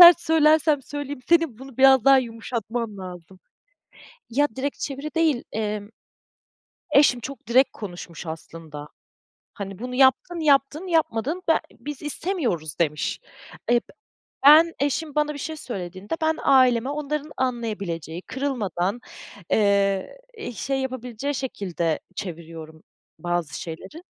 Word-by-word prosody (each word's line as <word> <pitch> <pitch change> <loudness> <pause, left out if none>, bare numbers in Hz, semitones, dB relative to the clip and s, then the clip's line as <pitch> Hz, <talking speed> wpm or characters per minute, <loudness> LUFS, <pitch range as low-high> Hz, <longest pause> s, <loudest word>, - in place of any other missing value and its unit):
sert 345 0 +11
söylersem 310 -3 +4
söyleyeyim, 290 -1 -6
senin 330 -9 +3
bunu 265 -2 -11
biraz 265 -2 +6
daha 275 -1 +7
yumuşatman 230 -2 -4
lazım. 180 0 -9 0.9
Ya, 290 +5 +3
direkt 275 +2 -3
çeviri 285 +3 -5
değil, 315 -7 +2
emm, 210 -1 -3 1.0
eşim 275 -4 +5
çok 275 0 -8
direkt 260 +3 +5
konuşmuş 175 -4 -8
aslında. 160 -2 -8 0.7
Hani, 195 -2 -7
bunu 250 +1 -5
yaptın, 275 +6 +3
yaptın, 295 +3 +2
yapmadın 320 0 0
b - - +7 0.3
biz 295 -1 -7
istemiyoruz 285 - -2
demiş. 150 -2 0 0.5
Eee - - +6
b - - 0 0.7
ben 320 +3 +8
eşim 290 +2 -1
bana 300 0 +1
bir - - -7
şey 315 +2 -5
söylediğinde, 190 - -5
ben 315 0 +2
aileme 255 -1 +4
onların 300 0 -3
anlayabileceği, 200 -10 -3
kırılmadan, 240 -7 -2 0.5
eee, 200 - +2 0.2
i 420 - -5
şey 270 +3 -2
yapabileceği 260 +1 -4
şekilde 180 - -2 0.2
çeviriyorum 165 -3 -8 0.4
bazı 175 -4 -2
şeyleri. 190 - -8
250 Hz, 120 wpm, -24 LUFS, 190-290 Hz, 1.0 s, sert